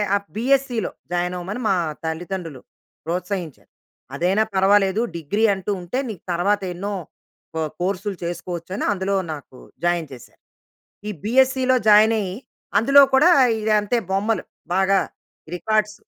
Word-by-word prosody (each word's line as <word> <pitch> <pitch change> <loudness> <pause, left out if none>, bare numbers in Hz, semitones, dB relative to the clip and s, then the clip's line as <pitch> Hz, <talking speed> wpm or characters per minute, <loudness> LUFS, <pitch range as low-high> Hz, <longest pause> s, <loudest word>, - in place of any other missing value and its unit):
ఆ - - +4 0.2
బీఎస్సీలో 250 -2 +1 0.2
జాయిన్ 180 0 -1
అవ్వమని 195 +7 -5
మా 195 - +3 0.3
తల్లిదండ్రులు 165 -2 -5 0.4
ప్రోత్సహించారు. 175 -2 -4 0.5
అదైనా 185 +7 +2
పర్వాలేదు, 195 +2 +3 0.2
డిగ్రీ 185 +8 -2
అంటూ 190 +1 -4
ఉంటే, 175 +9 -3
నీకు 205 - -8
తర్వాత 200 +4 +1
ఎన్నో 200 +4 -4 0.6
కొ 160 - -1 0.2
కోర్సులు 195 +2 -2
చేసుకోవచ్చని 175 +2 -4
అందులో 195 +1 -1 0.2
నాకు 140 -3 -11 0.3
జాయిన్ 175 -3 0
చేసారు. 125 - -14 0.7
ఈ - - -1
బీఎస్సీ‌లో 260 +2 +3
జాయినయ్యి 210 -2 +4 0.4
అందులో 275 +7 +7
కూడా 300 +7 +6 0.5
ఇంతే 210 +4 0
బొమ్మలు, 200 0 0 0.3
బాగా 195 +1 +3 0.6
రికార్డ్స్. 210 +3 -1
195 Hz, 115 wpm, -22 LUFS, 175-215 Hz, 0.7 s, అందులో